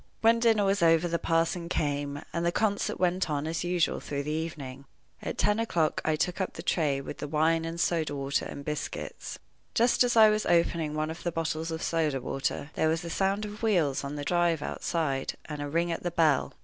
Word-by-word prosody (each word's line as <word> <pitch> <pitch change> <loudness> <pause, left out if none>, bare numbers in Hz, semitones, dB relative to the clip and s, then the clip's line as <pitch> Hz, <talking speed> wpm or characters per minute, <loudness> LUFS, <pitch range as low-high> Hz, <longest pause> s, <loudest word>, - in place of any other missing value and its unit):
When 230 +1 +5
dinner 225 -3 +3
was 195 0 +1
over 165 0 +4
the 170 0 -1
parson 165 +1 0
came, 145 -3 -2
and 170 - -1
the 170 - +2
concert 205 +2 0
went 180 -1 +1
on 145 -1 -1
as 160 +2 -2
usual 175 -1 +1
through 140 -1 -4
the 150 - -3
evening. 150 -4 -5 0.4
At - - -4
ten 210 +1 +2
o'clock 170 -9 +1
I 155 - +1
took 180 +4 -1
up 190 - -2
the - - -8
tray, 145 -5 +1
with 140 - -8
the - - -4
wine, 160 +2 +2
and 165 +1 -5
soda 160 -4 0
water, 140 0 -1
and 140 - -7
biscuits. 150 -1 -5 0.4
Just 240 +2 +4
as 240 -1 +1
I 215 -1 +8
was 215 0 0
opening 170 -3 +2
one 155 +1 -1
of 165 - -8
the 175 - -2
bottles 165 0 -2
of 160 0 -4
soda 155 -5 0
water, 135 +3 -3
there 160 - +1
was 165 +2 -1
a 170 - -5
sound 195 +3 0
of 210 0 -8
wheels 175 - +2
on 140 +1 -4
the 145 -1 -5
drive 170 -3 +2
outside, 140 -6 -2
and 150 -2 -6
a 145 - -3
ring 170 +3 0
at 165 - -3
the 175 - -1
bell. 160 -5 +2
165 Hz, 220 wpm, -28 LUFS, 150-175 Hz, 0.4 s, I